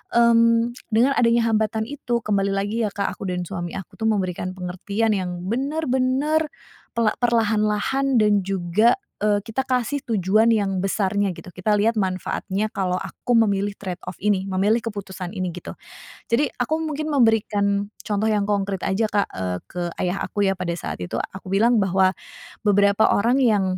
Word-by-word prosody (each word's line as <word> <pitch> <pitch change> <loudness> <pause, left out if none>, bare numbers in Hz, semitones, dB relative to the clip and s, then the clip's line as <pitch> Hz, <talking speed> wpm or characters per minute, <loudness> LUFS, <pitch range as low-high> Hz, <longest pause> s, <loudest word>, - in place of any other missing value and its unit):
mmm, 230 0 +4 0.2
dengan 240 +5 +4
adanya 230 -1 +3
hambatan 220 0 +1
itu 255 -4 -2
kembali 200 -2 +1
lagi, 205 +4 -1
ya, - - -6
Kak, 200 -1 -1
aku 195 - -6
dan 180 0 -2
suami 175 -2 -5
aku, 190 - -9
tuh, 220 - 0
memberikan 185 -3 -1
pengertian 190 +5 -2
yang 180 -2 -4
benar-benar 275 +4 0 0.5
pela 230 -2 +2
perlahan-lahan 230 +3 +1
dan 210 -1 +4
juga, 195 +4 +2 0.3
eee, 205 -1 +2
kita 225 +4 -2
kasih 255 +3 0
tujuan 215 0 +3
yang 195 -3 0
besarnya, 195 0 0
gitu. - - -11
Kita 210 +3 +1
lihat 225 +3 +2
manfaatnya 190 +2 -2
kalau 185 -2 -1
aku 195 +5 -3
memilih 205 -2 +2
trade 180 -2 -5
off - - -5
ini, 195 -1 +1
memilih 200 +4 +2
keputusan 195 -4 -5
ini, 185 -2 -2
gitu. 180 - -8 0.6
Jadi 265 +6 +3
aku 315 +1 0
mungkin 310 -1 -3
memberikan 205 -5 +2 0.2
contoh 210 0 0
yang 210 -2 +1
konkrit 200 -2 -1
aja, 200 +4 +1
Kak, 205 -1 +1
eee, 90 -1 -2
ke 180 - -4 0.2
ayah 180 +2 -1
aku, 205 - -1
ya, - - +3
pada 180 -2 -2
saat 170 - -5
itu. 90 - -5
Aku 190 0 -7
bilang 225 +4 +4
bahwa 190 0 +3 0.6
beberapa 200 +1 +4
orang 235 +6 +2
yang, 215 -6 +3
205 Hz, 165 wpm, -23 LUFS, 190-230 Hz, 0.6 s, mmm